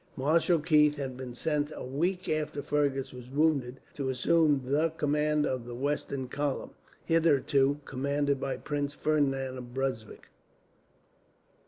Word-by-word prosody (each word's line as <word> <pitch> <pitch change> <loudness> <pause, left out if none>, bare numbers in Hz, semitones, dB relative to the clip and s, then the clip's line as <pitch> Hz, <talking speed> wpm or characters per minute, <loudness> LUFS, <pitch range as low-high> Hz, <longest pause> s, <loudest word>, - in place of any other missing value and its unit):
Marshal 165 +5 +3
Keith 150 -1 +4
had 135 -3 -4
been 125 -1 -7
sent, 150 +2 -1
a - - -6
week 180 +8 -1
after 150 -2 -2
Fergus 140 -2 0
was 125 -1 -10
wounded, 140 -3 +1
to 135 -2 -3
assume 145 +2 +3
the 150 +5 +2
command 150 0 +1
of 125 -2 -2
the 120 - -6
western 140 0 -2
column, 140 +1 -2 0.3
hitherto 145 -3 +3
commanded 140 +1 0
by 135 0 -2
Prince 145 -1 -3
Ferdinand 135 -4 0
of 120 0 -10
Brunswick. 130 -5 -4
140 Hz, 135 wpm, -29 LUFS, 130-150 Hz, 0.3 s, Keith